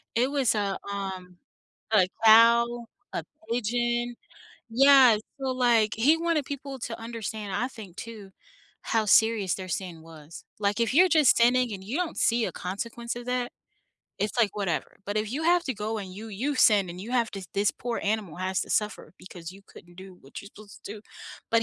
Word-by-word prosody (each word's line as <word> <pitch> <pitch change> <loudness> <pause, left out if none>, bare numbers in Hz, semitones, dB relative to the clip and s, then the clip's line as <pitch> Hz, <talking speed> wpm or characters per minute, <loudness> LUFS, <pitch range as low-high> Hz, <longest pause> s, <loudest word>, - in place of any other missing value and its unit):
it 255 +4 +2
was 270 -6 +1
a, 200 -2 -1
um 190 -2 -6 0.5
a 190 -4 +4 0.2
cow, 235 +2 +6 0.3
a - - -3 0.3
pigeon, 240 +1 -1 0.6
yeah, 260 -2 +7 0.2
so, 265 -1 -1
like, 235 -4 +3
he 285 +8 +4
wanted 330 -3 0
people 275 -1 -6
to 230 - -5
understand, 220 -3 -5
I 250 - -1
think 205 -8 -12
too, 215 -4 -9 0.5
how 220 -2 0
serious 220 -3 +3
their 185 -1 -6
sin 175 -2 -5
was, 160 -1 -13 0.2
like, 205 +2 0
if 230 +3 +1
you're 365 +3 +6
just 310 -5 +5
sinning 245 0 +3
and 190 -1 -7
you 240 +9 -4
don't 350 -2 -2
see 230 -1 +2
a - - -5
consequence 235 +6 -5
of 240 0 -8
that, 250 -1 -2 0.7
it's 210 +4 -2
like, 210 -3 +2
"Whatever." 195 -5 -3
But 205 +1 -3
if 215 +2 -1
you 305 +4 -3
have 350 +1 +3
to 260 - -2
go 215 +1 -3
and 190 -2 -7
you 220 +3 -8
you 250 +8 -2
sin 205 -7 +4
and 180 +1 -8
you 225 +5 -8
have 235 -3 +1
to 195 -2 -7
this 200 +1 +2
poor 240 -1 -4
animal 205 -6 -2
has 185 +1 -2
to - - -9
suffer 210 -2 -2
because 180 -2 -10
you 195 +1 -15
couldn't 175 0 -16
do 190 0 -11
what 135 - -10
you're 200 - -11
supposed 210 -1 -15
to - - -6
do, 210 - -11 0.5
but 230 0 +3
220 Hz, 195 wpm, -26 LUFS, 195-245 Hz, 0.7 s, yeah